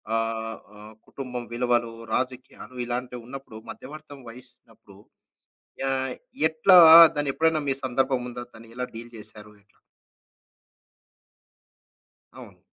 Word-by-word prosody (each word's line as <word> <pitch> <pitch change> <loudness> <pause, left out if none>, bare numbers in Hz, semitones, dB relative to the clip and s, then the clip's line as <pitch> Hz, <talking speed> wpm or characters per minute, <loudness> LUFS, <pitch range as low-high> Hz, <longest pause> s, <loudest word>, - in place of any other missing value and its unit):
ఆహ్, 115 0 -3 0.2
ఆహ్, 105 +1 -13
కుటుంబం 125 -3 -7
విలువలు, 120 -1 0 0.2
రాజకీయాలు 130 0 -5
ఇలాంటివున్నప్పుడు, 125 -1 -7
మధ్యవర్తం 145 0 -12
వహిస్తన్నప్పుడు 115 -4 -17 0.8
యా 135 - -1 0.6
ఎట్లా 160 +4 +4 0.4
దాన్నెప్పుడన్నా 155 +2 0
మీ 135 - +2
సందర్భముందా? 125 -1 -2
దాన్ని 115 0 -15
ఎలా 125 0 -3
డీల్ 115 +1 -10
జేసారు? 105 -1 -13
ఎట్లా? 105 - -35 2.6
అవును. - - -13
125 Hz, 90 wpm, -25 LUFS, 115-135 Hz, 2.6 s, ఎట్లా